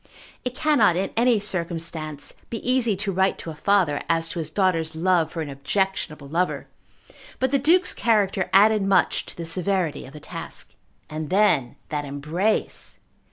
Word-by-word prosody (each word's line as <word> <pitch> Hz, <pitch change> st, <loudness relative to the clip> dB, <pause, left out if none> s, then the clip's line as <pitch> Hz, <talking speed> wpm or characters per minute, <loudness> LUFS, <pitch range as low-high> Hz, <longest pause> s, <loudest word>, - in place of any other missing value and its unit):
It 250 Hz, -1 st, -4 dB
cannot 275 Hz, -, +3 dB
in 190 Hz, +2 st, -1 dB
any 235 Hz, -1 st, +3 dB
circumstance 165 Hz, -6 st, -3 dB, 0.2 s
be 230 Hz, -, -3 dB
easy 250 Hz, -4 st, +2 dB
to 200 Hz, +1 st, -2 dB
write 190 Hz, +1 st, +1 dB
to 165 Hz, -, -6 dB
a -, -, -7 dB
father 170 Hz, -3 st, +2 dB
as 165 Hz, 0 st, +1 dB
to 170 Hz, -, -4 dB
his 160 Hz, -2 st, -3 dB
daughter's 165 Hz, -2 st, 0 dB
love 170 Hz, -1 st, +2 dB
for 165 Hz, -, -4 dB
an 150 Hz, -, -7 dB
objectionable 155 Hz, 0 st, -2 dB
lover; 170 Hz, +5 st, -1 dB, 0.7 s
but 260 Hz, 0 st, 0 dB
the 280 Hz, -, +3 dB
Duke's 350 Hz, +7 st, +3 dB
character 205 Hz, -5 st, +1 dB
added 210 Hz, +2 st, +5 dB
much 195 Hz, 0 st, +2 dB
to -, -, -8 dB
the 170 Hz, -, -5 dB
severity 180 Hz, -3 st, -1 dB
of 135 Hz, -, -13 dB
the 150 Hz, -, -9 dB
task. -, -, -8 dB, 0.3 s
And 155 Hz, -1 st, -5 dB
then 185 Hz, -, +3 dB
that 150 Hz, -1 st, -2 dB
embrace! 150 Hz, +9 st, -2 dB
185 Hz, 165 wpm, -24 LUFS, 160-210 Hz, 0.7 s, added